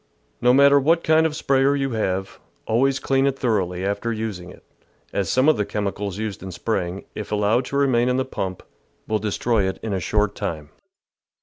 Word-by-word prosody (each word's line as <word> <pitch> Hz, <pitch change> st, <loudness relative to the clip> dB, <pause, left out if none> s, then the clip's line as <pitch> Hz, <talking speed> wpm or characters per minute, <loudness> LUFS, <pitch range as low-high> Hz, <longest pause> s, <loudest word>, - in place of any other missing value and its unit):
No 125 Hz, -, +5 dB
matter 140 Hz, +2 st, +6 dB
what 165 Hz, +5 st, +2 dB
kind 160 Hz, 0 st, +4 dB
of 155 Hz, -, -6 dB
a -, -, -7 dB
sprayer 135 Hz, -2 st, +2 dB
you 135 Hz, -1 st, -1 dB
have, 95 Hz, -4 st, -2 dB, 0.3 s
always 135 Hz, +4 st, +2 dB
clean 135 Hz, -1 st, +1 dB
it 135 Hz, -1 st, -1 dB
thoroughly 95 Hz, -7 st, -1 dB
after 100 Hz, +4 st, -1 dB
using 110 Hz, -6 st, -4 dB
it, -, -, -15 dB, 0.5 s
as 100 Hz, -3 st, -1 dB
some 130 Hz, +3 st, +3 dB
of 155 Hz, -, +5 dB
the 105 Hz, -, +1 dB
chemicals 100 Hz, -1 st, -3 dB
used 110 Hz, -2 st, -4 dB
in 95 Hz, 0 st, -7 dB
spraying, 95 Hz, -1 st, -3 dB
if 105 Hz, -, -7 dB
allowed 105 Hz, +4 st, +2 dB
to 140 Hz, -, -3 dB
remain 125 Hz, -3 st, +2 dB
in 125 Hz, -, +1 dB
the 130 Hz, -, 0 dB
pump, 95 Hz, -7 st, -5 dB, 0.4 s
will 110 Hz, 0 st, 0 dB
destroy 105 Hz, 0 st, 0 dB
it 95 Hz, -, -3 dB
in 110 Hz, -2 st, -2 dB
a 95 Hz, -, 0 dB
short 105 Hz, +3 st, 0 dB
time. 80 Hz, -7 st, -5 dB
110 Hz, 200 wpm, -22 LUFS, 100-135 Hz, 0.5 s, matter